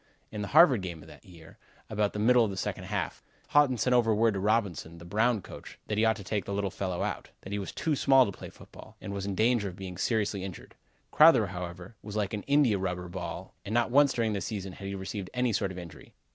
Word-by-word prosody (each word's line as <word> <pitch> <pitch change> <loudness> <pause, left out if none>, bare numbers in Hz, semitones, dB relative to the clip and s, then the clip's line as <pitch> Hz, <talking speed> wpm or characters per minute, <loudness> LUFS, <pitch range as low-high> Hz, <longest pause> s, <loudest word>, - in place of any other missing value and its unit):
In 105 - -5
the 100 - -3
Harvard 145 - +6
game 85 -4 -6
of - - -15
that - - -15
year, 90 +3 -15 0.3
about 105 -2 -1
the - - -5
middle 120 +3 +5
of 110 - 0
the 95 - -6
second 95 -1 -3
half, 95 -4 -3 0.3
Haughton 145 -4 +4
sent 125 +2 +2
word 120 -2 +3
over 110 +1 +3
to 100 - -3
Robinson, 100 -6 -1
the 85 - -12
Brown 110 +3 +1
coach, - - -11
that 105 - -2
he - - +3
ought 110 0 +3
to 105 - -9
take 100 0 -2
the 100 - -3
little 100 -2 -1
fellow 95 -2 -3
out; - - -4
that 95 - -10
he 100 - -1
was 100 - -5
too 155 -2 -1
small 135 -1 +5
to 100 - -3
play - - -9
football, - - -15
and 100 - -6
was 100 0 -4
in 100 - -2
danger 110 -1 +2
of 90 - -10
being 90 -1 -8
seriously 105 -4 0
injured. 95 -3 -8 0.4
Crowther, - - +7
however, 90 +3 -7
was 105 0 -8
like 105 -2 -1
an 105 - -2
India 140 -8 +3
rubber 90 -1 -3
ball - - -6
and 110 - -4
not 120 0 +2
once 140 +1 +5
during 115 -4 0
the 100 - -2
season 100 -4 -5
had 100 - -8
he 100 - -4
received 95 0 -5
any 125 -2 +1
sort 100 -1 0
of 95 - -9
injury. 85 -2 -11
100 Hz, 255 wpm, -29 LUFS, 95-115 Hz, 0.4 s, Crowther